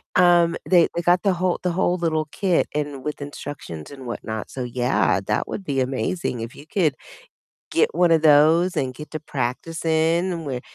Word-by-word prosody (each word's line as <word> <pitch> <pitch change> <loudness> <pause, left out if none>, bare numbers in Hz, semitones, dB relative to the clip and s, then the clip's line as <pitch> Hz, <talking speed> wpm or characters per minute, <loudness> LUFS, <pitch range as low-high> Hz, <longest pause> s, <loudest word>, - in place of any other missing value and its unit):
um, 175 -2 +5
they 175 -3 +6
they 170 - 0
got 175 +1 +3
the 195 -2 +3
whole 180 0 0
the 180 - +1
whole 180 0 +1
little 160 -3 0
kit 185 -4 +1
and 145 -3 -3
with 150 0 -4
instructions 145 - -7
and 135 -2 -10
whatnot. 110 -2 -5
So 130 - -5
yeah, 120 -6 +1
that 105 - 0
would 200 - -5
be 135 -4 0
amazing 130 +2 -2
if 115 +1 -7
you 145 - -12
could 165 -8 +2 0.8
get 455 +1 +2
one 175 -2 +4
of 160 -1 +3
those 160 +4 +5
and 130 -2 -1
get 150 +2 -10
to 155 - -4
practicing 160 +6 -1
where, 130 -3 -3
155 Hz, 185 wpm, -23 LUFS, 130-175 Hz, 0.8 s, they